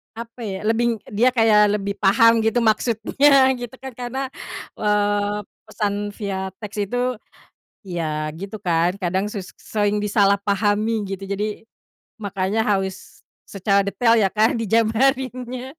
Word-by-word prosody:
apa 230 +1 -9
ya, 200 -4 -4
lebih 230 +2 +1 0.2
dia 225 +5 +3
kayak 210 -2 +5
lebih 200 -1 -4
paham 230 +3 +5
gitu 225 +2 +1
maksudnya 260 +5 +3
gitu 245 +1 -7
kan 265 - -6
karena, 255 +2 -5 0.5
eee, 205 0 +1 0.2
pesan 205 -1 -3
via 195 -3 -3
teks 210 -1 -9
itu, 245 0 -1 0.7
ya 155 -4 -3
gitu 195 +5 -7
kan, 175 +2 0
kadang 190 +2 -1
sus 195 -4 -7
sering 210 -1 -1
disalah 200 -1 +3
pahami 205 +1 0
gitu, 195 0 -6
jadi, 210 +2 -3 0.6
makanya 200 +2 -1
harus 195 -3 -3 0.2
secara 200 0 +2
detail 230 +4 +2
ya 210 -4 +3
kan, 220 +3 +2
dijabarinnya. 250 +3 0
210 Hz, 130 wpm, -22 LUFS, 200-230 Hz, 0.7 s, kayak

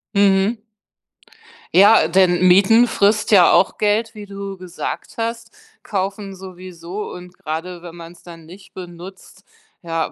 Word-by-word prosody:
Mhm. 200 +2 +2 1.1
Ja, 200 -2 +6
denn 180 +1 +3
mieten 200 +6 +5
frisst 215 -1 +1
ja 190 -4 +6
auch 190 - +2
Geld, 215 +2 0
wie 210 -2 -10
du 200 -1 -7
gesagt 180 -1 -7
hast, 230 0 -4 0.3
kaufen 195 0 -4
sowieso. 185 0 -9
Und 180 0 -11
gerade 170 +3 -6
wenn 170 -1 -11
man's 170 0 -12
dann 165 -2 -13
nicht 190 +3 -16
benutzt, 180 +1 -12 0.4
ja, 165 -2 -3
190 Hz, 130 wpm, -19 LUFS, 175-205 Hz, 1.1 s, Ja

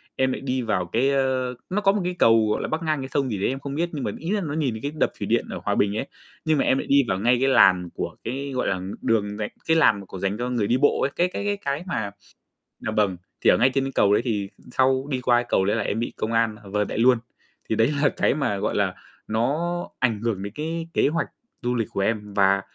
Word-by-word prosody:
em 130 0 +1
lại - - -4
đi 130 -1 -1
vào 105 -6 0
cái 120 +10 +1
ơ, 130 -2 0
nó 205 +3 0
có 195 - +5
một 205 0 -1
cái 180 0 -2
cầu, 115 -1 +5
gọi - - 0
là, - - -2
bắc 160 +2 -2
ngang 155 -3 0
cái 130 - -6
sông 135 -1 0
gì 105 - -2
đấy - - +2
em 135 - -3
không 140 0 -5
biết, 170 +3 0
nhưng 145 -4 -3
mà - - -1
ý 165 +5 -3
là 210 - +1
nó 150 -5 -3
nhìn 145 -6 0
thấy 110 - -7
cái 145 - -3
đập - - +2
thủy - - -3
điện - - +1
ở - - -5
Hòa - - +1
Bình 100 +1 +1
ấy, 135 - -3 0.4
nhưng 155 -1 +3
mà - - +2
em 130 - +3
lại - - -3
đi 140 0 +5
vào 95 -2 0
ngay 120 +4 +3
cái 135 - +3
làn 90 -8 +5
của - - -4
cái, 135 +4 -4
gọi 125 - 0
là, 100 - +1
ng 95 +2 -6
đường 105 -2 0
dành 105 -1 -3 0.2
cái 160 - +4
làn 110 -10 +5
mà 100 - -10
của 95 - -9
dành 100 +2 -1
cho 125 +1 -2
người 115 -5 0
đi 125 - +2
bộ 145 +2 +3
ấy, 140 - +1
cái 175 - +2
cái 205 - -3
cái 205 0 0
cái 145 -4 -3
mà 110 - -2 0.7
dạ 110 - -3
vâng, 100 -4 +1 0.2
thì - - +4
ở - - +5
ngay 130 - +4
trên 135 0 0
cầu 100 -5 +3
đấy 105 - +3
thì 105 -5 -1 0.2
sau 130 +1 +2
đi 130 -2 -1
qua 120 -1 +4
cái 120 - 0
cầu 95 - +2
đấy 105 - +1
là - - 0
em 110 - -2
bị 120 - -3
công 110 - -2
an, 115 -1 +2
ờ, 100 - -11
vợt 105 0 0
lại - - -4
luôn. 125 +2 +5 0.5
Thì 110 - +1
đấy 115 +5 +3
là 145 - +5
cái - - +1
mà, 140 -9 -1
gọi - - -1
là, - - +1 0.3
nó 155 +11 -1
ảnh 115 -5 +1
hưởng 110 -5 -1
đến 100 0 -6
cái 165 +2 -3
kế - - +3
hoạch 165 +3 0 0.3
du 125 +1 -1
lịch 115 -3 0
của - - -3
em. 105 0 -1
Và 100 -1 +3
125 Hz, 295 wpm, -24 LUFS, 105-140 Hz, 0.7 s, có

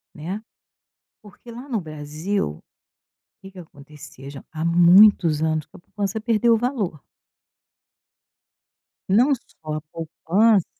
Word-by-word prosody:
Né, 180 +8 -6 0.8
porque 215 +3 -15
lá 245 +4 -10
no 230 -7 -2
Brasil, 155 - -4 0.8
que 195 - -11
que 190 - -16
aconteceu, 145 -4 -13
já, 140 -1 -11
há 160 0 -4
muitos 170 -1 +5
anos 155 -2 -1
que - - -17
a - - -15
poupança 200 +4 -4
perdeu 230 +1 +2
valor. 220 - -3 2.1
Não 245 +9 +4
só 155 -10 -10
a 155 - -4
poupança 190 +5 +1
175 Hz, 115 wpm, -22 LUFS, 155-215 Hz, 2.1 s, muitos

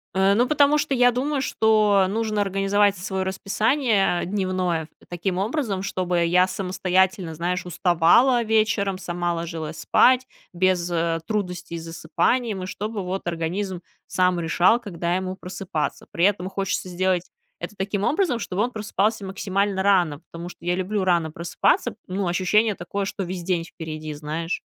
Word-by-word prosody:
Э, 190 +1 +4
ну, 240 +5 +3
потому 290 +1 +4
что 290 -1 -1
я 245 0 +5
думаю, 270 +3 -1
что 215 -5 +3
нужно 215 0 -1
организовать 195 +1 +2
своё 190 +1 -3
расписание 200 +1 +1
дневное 185 -4 -1 0.2
таким 180 +1 -3
образом, 205 -2 -1
чтобы 180 -3 0
я 180 +2 +4
самостоятельно, 185 -1 0
знаешь, 180 +3 -2
уставала 180 - +4
вечером, 215 -3 +1
сама 175 -1 -2
ложилась 165 -2 -5
спать 255 +10 +4 0.3
без, 180 -1 +1
э, 165 -1 0
трудностей 180 -5 -3
с 165 - -7
засыпанием, 180 +6 -1
и - - -3
чтобы 210 +2 -4
вот 185 0 -4
организм 175 +3 -3 0.3
сам 180 -1 +1
решал, 175 +7 +3
когда 175 -5 -3
ему 185 0 -3
просыпаться. 180 -4 -4
При 170 - +2
этом 190 -2 +1
хочется 195 -1 -2
сделать 180 0 0 0.3
это 210 - -7
таким 195 +1 -2
образом, 305 - +1
чтобы 195 -2 -2
он 245 - -2
просыпался 215 -1 -1
максимально 195 0 -1
рано, 180 -7 +3
потому 170 +1 -7
что 170 - -14
я 175 0 +1
люблю 190 +2 -1
рано 170 -3 +2
просыпаться. 170 +2 0
Ну, 190 +1 -2
ощущение 200 +5 +2
такое, 195 +2 -4
что 195 0 -4
весь 180 0 -5
день 175 -1 0
впереди, 155 -2 -7
знаешь. 155 +3 -4
190 Hz, 155 wpm, -23 LUFS, 175-205 Hz, 0.3 s, я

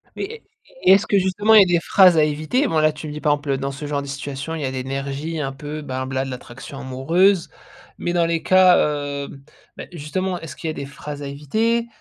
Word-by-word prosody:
Mais, - - -4
est 445 - -9
est 455 - -12 0.5
est - - +10
est-ce 200 +3 +3
que 200 - +3
justement, 195 +3 +2
il 210 - +10
y - - +8
a - - +1
des - - 0
phrases 185 -4 +6
à 155 - +5
éviter? 155 - 0
Bon, 160 -8 +1
là 155 0 +4
tu 150 +1 -8
me 150 - -6
dis 150 - -6
par 150 - +2
exemple: 145 0 -5
«Heu, 135 - +1
dans 135 +1 -3
ce 140 +2 -7
genre 145 -1 -1
de 140 - -8
situation, 140 +2 -5
il 160 - -5
y - - -1
a - - -1
de - - -8
l'énergie, 135 +4 -4
un 135 -2 -2
peu, 150 +2 -7
ben, 130 -2 -4
voilà, 130 0 -2
de - - -6
l'attraction 125 +2 -9
amoureuse». 165 +8 +2 0.5
Mais 175 - -2
dans 170 -1 +2
les 165 -1 -1
cas, 185 -1 +6
heu, 145 -1 -1 0.5
ben, - - -8
justement, 180 +3 -3
est-ce 160 -5 -9
qu'il 165 - -6
y - - 0
a - - -6
des 140 - -6
phrases 145 +1 -8
à 140 - -5
éviter? 220 +12 -1
150 Hz, 270 wpm, -21 LUFS, 140-180 Hz, 0.5 s, est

